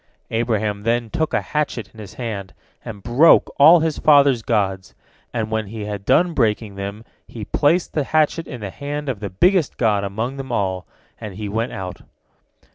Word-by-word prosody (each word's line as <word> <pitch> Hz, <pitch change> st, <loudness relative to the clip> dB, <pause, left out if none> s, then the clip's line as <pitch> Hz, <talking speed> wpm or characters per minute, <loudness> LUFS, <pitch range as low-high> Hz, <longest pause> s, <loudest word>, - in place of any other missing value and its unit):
Abraham 110 Hz, -3 st, -1 dB
then 115 Hz, +1 st, -1 dB
took 160 Hz, -1 st, -1 dB
a -, -, +1 dB
hatchet 145 Hz, -8 st, -3 dB
in 110 Hz, -, -14 dB
his 100 Hz, -3 st, -10 dB
hand, 105 Hz, -6 st, -5 dB, 0.3 s
and 105 Hz, -3 st, -9 dB
broke 125 Hz, +9 st, +5 dB
all 160 Hz, +4 st, +8 dB
his 160 Hz, -2 st, -1 dB
father's 140 Hz, -5 st, +5 dB
gods, 95 Hz, -5 st, -1 dB, 0.4 s
and 110 Hz, -2 st, -3 dB
when 110 Hz, -1 st, -1 dB
he 105 Hz, 0 st, -6 dB
had 100 Hz, -1 st, -6 dB
done 175 Hz, -1 st, +3 dB
breaking 110 Hz, -5 st, 0 dB
them 100 Hz, +3 st, -6 dB, 0.2 s
he 110 Hz, -3 st, -8 dB
placed 160 Hz, -, +1 dB
the 150 Hz, -3 st, 0 dB
hatchet 155 Hz, +2 st, +1 dB
in 125 Hz, -5 st, -8 dB
the 100 Hz, -2 st, -5 dB
hand 145 Hz, +3 st, -5 dB
of 120 Hz, -6 st, -3 dB
the 100 Hz, -, -5 dB
biggest 175 Hz, -, +2 dB
god 105 Hz, -4 st, +1 dB
among 110 Hz, +7 st, -3 dB
them 135 Hz, -2 st, -6 dB
all, 95 Hz, -4 st, -2 dB, 0.3 s
and 105 Hz, -4 st, -7 dB
he 105 Hz, +1 st, -5 dB
went 110 Hz, +4 st, -2 dB
out. 90 Hz, -2 st, -6 dB
115 Hz, 185 wpm, -21 LUFS, 100-140 Hz, 0.4 s, all